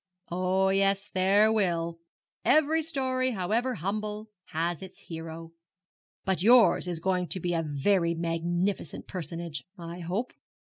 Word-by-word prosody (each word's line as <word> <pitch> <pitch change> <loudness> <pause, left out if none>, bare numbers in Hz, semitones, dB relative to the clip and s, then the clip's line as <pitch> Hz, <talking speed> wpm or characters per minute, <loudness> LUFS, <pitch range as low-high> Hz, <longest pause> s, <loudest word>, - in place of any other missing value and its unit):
'Oh, 185 +2 +2
yes, 195 +1 +1
there 200 +4 +4
will! 170 -5 0 0.4
Every 310 +1 +4
story, 260 -5 0
however 225 +6 0
humble, 210 +3 -3 0.2
has 170 +2 -2
its 190 -1 -10
hero; 165 0 -8 0.7
but 190 -2 0
yours 220 -5 +6
is 175 -2 -1
going 180 0 0
to 185 - +1
be 175 0 -1
a 165 - +1
very 170 +3 +1
magnificent 170 +1 -2
personage, 170 -4 -4
I 170 0 -7
hope.' 185 +8 -3
185 Hz, 130 wpm, -28 LUFS, 170-210 Hz, 0.7 s, yours